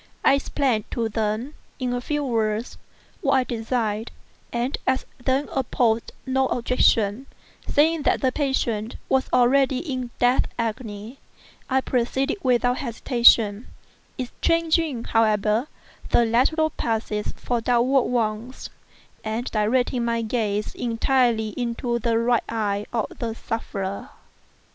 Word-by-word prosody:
I - - +7
explained 275 -5 0
to 230 -2 -1
them, 220 +5 -2 0.2
in 250 -1 -2
a 245 - -2
few 295 +3 -2
words, 225 -2 -1 0.4
what 275 - +2
I 260 - +4
designed, 225 -2 -2 0.4
and 240 +3 -1
as 260 0 +1 0.2
they 265 +3 +1
opposed 235 -3 0
no 265 0 +1
objection, 235 -1 +1 0.4
saying 315 +2 +3
that - - +2
the 260 - +2
patient 240 -6 -1
was 265 0 +1
already 260 +1 +4
in 260 -3 -3
the - - -10
death 245 +1 +3
agony, 225 0 -4 0.5
I 265 0 +2
proceeded 265 - 0
without 245 -2 +2
hesitation—exchanging, 250 +5 +1
however, 215 +2 +2 0.4
the 235 - +4
lateral 295 +8 +2
passes 220 -4 -2
for 240 -2 -2
downward 245 +3 +3
ones, 235 +1 -2 0.5
and 220 +3 -3
directing 240 +3 +1
my 230 0 0
gaze 215 -2 -1
entirely 235 -1 +1
into 235 +1 -2
the 230 0 +1
right 235 0 +2
eye 210 -2 -1
of 225 -3 -3
the 225 -2 -3
sufferer. 205 +1 -4
240 Hz, 120 wpm, -24 LUFS, 225-260 Hz, 0.5 s, I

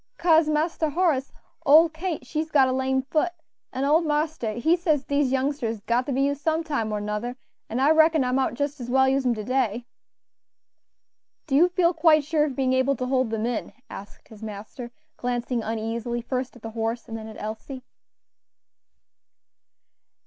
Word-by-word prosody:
"Kase, 325 -2 +4
Marster 315 +1 0
Horace, 300 -4 0 0.3
ole 310 +4 +7
Kate 320 +1 -5
she's 315 +1 -3
got 275 -3 +4
a - - 0
lame 265 0 0
foot, 310 +6 0 0.4
an' 260 - -3
ole 305 +4 +4
marster 300 -7 -1
he 280 +10 +2
says 315 -5 0
dese 285 -1 +1
youngsters 265 -3 -1
is 210 - -15
got 235 +4 0
to - - -2
be 270 +1 +1
used 285 0 -1
some 320 +1 0
time 275 -9 -2
or 210 - -1
nuther, 210 +4 -3 0.3
an' 230 - -2
I 280 +3 +4
reckoned 315 -3 +4
I 250 - 0
mout 260 -1 0
jis 285 +1 -3
as 240 - -6
well 265 +1 +4
use 265 0 +1
'em 240 - +2
to 215 - -5
day." 245 -1 -1 1.6
"Do 270 - -1
you 345 +5 +5
feel 360 -1 +2
quite 315 -2 +4
sure 300 +1 +1
of 280 -4 -4
being 260 -1 +1
able 260 +2 +2
to 255 - -3
hold 255 -2 +1
them 220 0 -2
in?" 240 -1 -3 0.2
asked 200 - -11
his 220 -1 -14
master, 220 +3 -8 0.3
glancing 245 -1 -2
uneasily 230 +2 -3
first 255 +1 -3
at 245 - -16
the 225 - -6
horses 225 +1 -3
and 225 - -5
then 220 -1 -7
at 220 - -10
Elsie. 225 +5 -7
265 Hz, 185 wpm, -25 LUFS, 235-305 Hz, 1.6 s, ole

